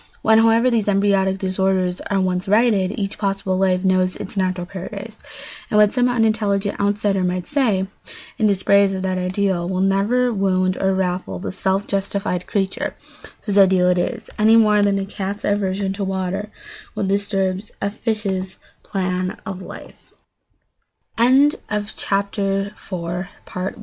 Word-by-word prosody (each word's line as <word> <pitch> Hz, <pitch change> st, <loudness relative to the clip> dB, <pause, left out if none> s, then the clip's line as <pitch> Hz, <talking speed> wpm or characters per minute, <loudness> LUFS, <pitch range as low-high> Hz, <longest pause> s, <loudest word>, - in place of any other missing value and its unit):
When, 220 Hz, 0 st, +5 dB
however, 230 Hz, +2 st, +4 dB
these 225 Hz, -3 st, +1 dB
embryonic 195 Hz, -1 st, +2 dB
disorders 190 Hz, -1 st, 0 dB
are 200 Hz, -, +1 dB
once 185 Hz, 0 st, -1 dB
righted, 205 Hz, -3 st, +3 dB
each 200 Hz, -1 st, -3 dB
possible 195 Hz, -2 st, -1 dB
life 185 Hz, -1 st, +1 dB
knows 185 Hz, -1 st, +2 dB
its 200 Hz, -, -8 dB
natural 185 Hz, -2 st, -1 dB
paradise, 200 Hz, +4 st, -8 dB, 0.5 s
and 210 Hz, -, +1 dB
what 210 Hz, -1 st, +6 dB
some 250 Hz, 0 st, +2 dB
unintelligent 215 Hz, -4 st, 0 dB
outsider 200 Hz, -1 st, +1 dB
might 180 Hz, 0 st, -1 dB
say 225 Hz, -10 st, +1 dB, 0.5 s
in 215 Hz, -, +3 dB
dispraise 200 Hz, 0 st, +3 dB
of 190 Hz, -, -4 dB
that 185 Hz, -1 st, -1 dB
ideal 185 Hz, -1 st, -1 dB
will 185 Hz, -1 st, -1 dB
never 210 Hz, +6 st, +2 dB
wound 185 Hz, -2 st, +1 dB
or 190 Hz, 0 st, +2 dB
ruffle 185 Hz, -1 st, -2 dB
the 185 Hz, -, -5 dB
self 190 Hz, +1 st, -1 dB
justified 195 Hz, -2 st, -2 dB
creature 195 Hz, -2 st, -2 dB, 0.5 s
whose 205 Hz, -2 st, +2 dB
ideal 185 Hz, -2 st, +5 dB
it 180 Hz, 0 st, +2 dB
is, -, -, -3 dB
any 220 Hz, +1 st, +6 dB
more 210 Hz, -2 st, +5 dB
than 200 Hz, -1 st, +2 dB
a 195 Hz, -, -2 dB
cat's 200 Hz, +1 st, -5 dB
aversion 195 Hz, -1 st, 0 dB
to 200 Hz, +1 st, -4 dB
water 190 Hz, +2 st, -3 dB, 0.5 s
will -, -, -2 dB
disturb 195 Hz, -1 st, 0 dB, 0.2 s
a 200 Hz, -, -1 dB
fi 220 Hz, +1 st, -2 dB
195 Hz, 130 wpm, -20 LUFS, 185-205 Hz, 0.5 s, what